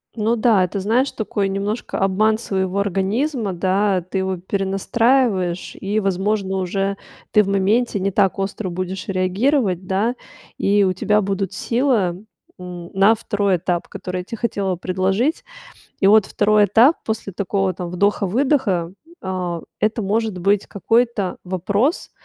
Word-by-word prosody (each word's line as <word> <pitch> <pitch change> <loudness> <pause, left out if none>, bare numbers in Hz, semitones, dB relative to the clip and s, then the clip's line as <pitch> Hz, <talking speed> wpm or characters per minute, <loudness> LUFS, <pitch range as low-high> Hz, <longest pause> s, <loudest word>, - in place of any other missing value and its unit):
Ну 225 +1 +1
да, 215 -4 +3
это, 180 +2 -2
знаешь, 235 +8 +1
такой 205 -2 -2
немножко 200 +4 -3
обман 215 +3 +2
своего 190 -3 -1
организма, 205 - -1
да, 190 +2 +1
ты 185 +3 -4
его 190 -1 -1
перенастраиваешь, 195 +1 0
и, 205 +2 -1
возможно, 195 0 -1
уже 195 +2 -1 0.3
ты 210 - +5
в 195 - -6
моменте 200 +3 +1
не 195 +1 0
так 195 0 +1
остро 195 0 -3
будешь 185 +2 -5
реагировать, 190 - +1
да, 205 +6 0 0.4
и 200 0 +3
у 185 - +2
тебя 210 +3 +1
будут 195 -1 -2
сила, 230 -8 0 0.4
м, 180 -1 -8
на 195 +3 +5
2 205 -4 0
этап, 175 0 -2
который 180 0 -5
я - - -9
те 230 - -7
хотела 200 -5 -1
предложить. 190 - 0 0.6
И 195 - +4
вот 210 0 +6
2 210 0 +3
этап 230 - +5
после 220 -3 -3
такого 195 -2 -1
там 175 -1 -5
вдоха-выдоха- 200 - +1 0.3
а, 180 -3 -3 0.2
это, 215 +1 0
может 215 0 -1
быть, 200 +3 +1
какой-то 225 0 0
вопрос, 200 - -1
195 Hz, 145 wpm, -20 LUFS, 185-215 Hz, 0.6 s, вот